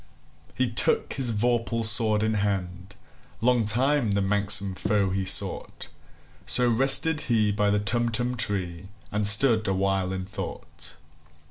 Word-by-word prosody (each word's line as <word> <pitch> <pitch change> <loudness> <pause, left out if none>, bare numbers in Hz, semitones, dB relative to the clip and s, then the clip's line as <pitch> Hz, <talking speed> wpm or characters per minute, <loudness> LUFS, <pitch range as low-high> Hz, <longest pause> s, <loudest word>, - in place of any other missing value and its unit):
He 130 - -1
took 115 - -1
his 130 -3 +1
vorpal 115 +1 -2
sword 110 -1 +5
in 110 0 -2
hand:Long 100 +4 -5
time 125 0 0
the 100 - -1
manxome 100 0 +3
foe 100 -1 -2
he 95 0 -3
sought—So 80 +5 +1
rested 135 +6 +2
he 110 -3 0
by 105 0 -1
the 105 0 -1
Tumtum 120 +4 -2
tree, 95 -6 -2 0.2
And 105 0 -2
stood 110 +1 +2
awhile 95 -1 -2
in 95 -1 -6
thought. 100 +1 -9
105 Hz, 125 wpm, -23 LUFS, 95-120 Hz, 0.2 s, sword